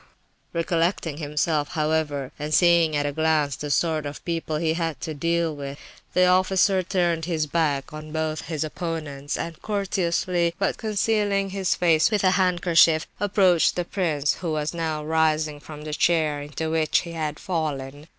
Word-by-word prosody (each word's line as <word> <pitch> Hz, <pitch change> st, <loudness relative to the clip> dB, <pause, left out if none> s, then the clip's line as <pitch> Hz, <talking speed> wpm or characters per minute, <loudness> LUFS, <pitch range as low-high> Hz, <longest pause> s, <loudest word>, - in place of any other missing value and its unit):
Ha, -, -, -27 dB
ha!" -, -, -15 dB
Recollecting 165 Hz, -2 st, 0 dB
himself, 150 Hz, 0 st, 0 dB
however, 150 Hz, -3 st, -1 dB
and 150 Hz, +1 st, -1 dB
seeing 170 Hz, -3 st, +4 dB
at 145 Hz, 0 st, 0 dB
a 145 Hz, -, 0 dB
glance 155 Hz, -2 st, +1 dB
the 150 Hz, -, -6 dB
sort 155 Hz, 0 st, +1 dB
of 145 Hz, -, -9 dB
people 165 Hz, -2 st, -2 dB
he 160 Hz, 0 st, +1 dB
had 165 Hz, -2 st, -2 dB
to 160 Hz, -, -4 dB
deal 165 Hz, +1 st, 0 dB
with, 140 Hz, -1 st, -6 dB, 0.4 s
the 180 Hz, -, +5 dB
officer 185 Hz, +1 st, +3 dB
turned 175 Hz, -3 st, 0 dB
his 165 Hz, -3 st, -1 dB
back 150 Hz, -3 st, -1 dB
on 155 Hz, 0 st, -8 dB
both 155 Hz, 0 st, -3 dB
his 160 Hz, -2 st, -2 dB
opponents, 155 Hz, -3 st, -4 dB
and 165 Hz, -1 st, -6 dB
courteously, 180 Hz, -4 st, 0 dB
but 195 Hz, 0 st, 0 dB
concealing 205 Hz, -2 st, 0 dB
his 190 Hz, -2 st, 0 dB
face 165 Hz, -3 st, +3 dB
with 210 Hz, -3 st, 0 dB
his 185 Hz, 0 st, +4 dB
handkerchief, 175 Hz, -3 st, +4 dB
approached 190 Hz, -4 st, +3 dB
the 175 Hz, -, -1 dB
prince, 155 Hz, -7 st, 0 dB
who 165 Hz, -3 st, -3 dB
was 150 Hz, +1 st, -2 dB
now 160 Hz, -2 st, -3 dB
rising 155 Hz, -1 st, +1 dB
from 150 Hz, 0 st, -10 dB
the 155 Hz, 0 st, -5 dB
chair 155 Hz, -3 st, +1 dB
into 155 Hz, +2 st, -4 dB
which 160 Hz, -1 st, +2 dB
he 170 Hz, -, -8 dB
had 155 Hz, -2 st, -3 dB
fallen. 150 Hz, -5 st, -4 dB
160 Hz, 170 wpm, -24 LUFS, 150-175 Hz, 0.4 s, the